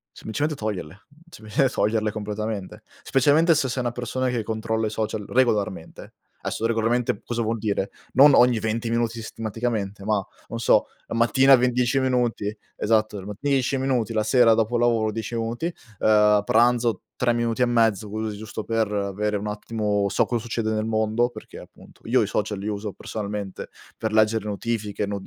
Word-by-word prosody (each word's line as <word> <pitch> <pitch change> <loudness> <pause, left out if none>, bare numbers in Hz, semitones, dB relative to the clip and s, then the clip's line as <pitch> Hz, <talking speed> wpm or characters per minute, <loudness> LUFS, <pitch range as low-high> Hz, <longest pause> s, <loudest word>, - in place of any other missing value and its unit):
semplicemente 150 +7 -2
toglierle, 100 -3 -5 0.3
sempl 110 +2 0
toglierle 110 0 0
completamente. 105 0 -5 0.2
Specialmente 150 +5 +4
se 140 -3 +1
sei 125 +1 -2
una 120 - -1
persona 125 +2 -2
che 120 -3 -1
controlla 110 0 -2
i - - -2
social 110 -1 -3
regolarmente. 105 -9 -1 0.3
Adesso 115 - -2
regolarmente 115 -1 0
cosa 120 -1 -2
vuol 115 +1 -1
dire? 100 -2 -1 0.2
Non 140 +3 +7
ogni 120 -2 +5
venti 110 +1 -2
minuti 115 0 0
sistematicamente, 110 -3 -4
ma 105 -1 +1 0.3
non 115 - -4
so - - +3 0.2
la - - -4
mattina 130 +4 +5
ve 125 0 +2
10 125 +2 +1
minuti, 120 -5 0 0.2
esatto, 110 -1 +1
e - - -11
10 135 -2 +1
minuti, 130 -4 0
la 110 -1 +1
sera 115 +1 +5
dopo 115 +2 +1
lavoro 115 -2 +2
10 110 +1 -5
minuti, 120 +10 -2 0.3
ehm, 105 -1 +4
pranzo 120 +1 +2
3 125 -1 +1
minuti 120 0 -1
e 125 - +6
mezzo 110 -4 +2
così 110 0 -3
giusto 110 0 -6
per 115 -2 0
avere 105 +1 -1
un 105 - -5
attimo, 105 -1 -1
so - - +2
cosa 120 -2 -2
succede 115 -1 -2
nel 110 0 -1
mondo, 110 +2 +1
perché - - -11
appunto - - -16
io - - +3
i - - -2
social 105 -1 -2
li 100 - -5
uso 105 0 -3
personalmente 100 -1 -6 0.3
per 110 - -2
leggere 110 0 +2
notifiche, 105 0 -2
no 100 -1 -4
110 Hz, 170 wpm, -24 LUFS, 105-120 Hz, 0.3 s, Non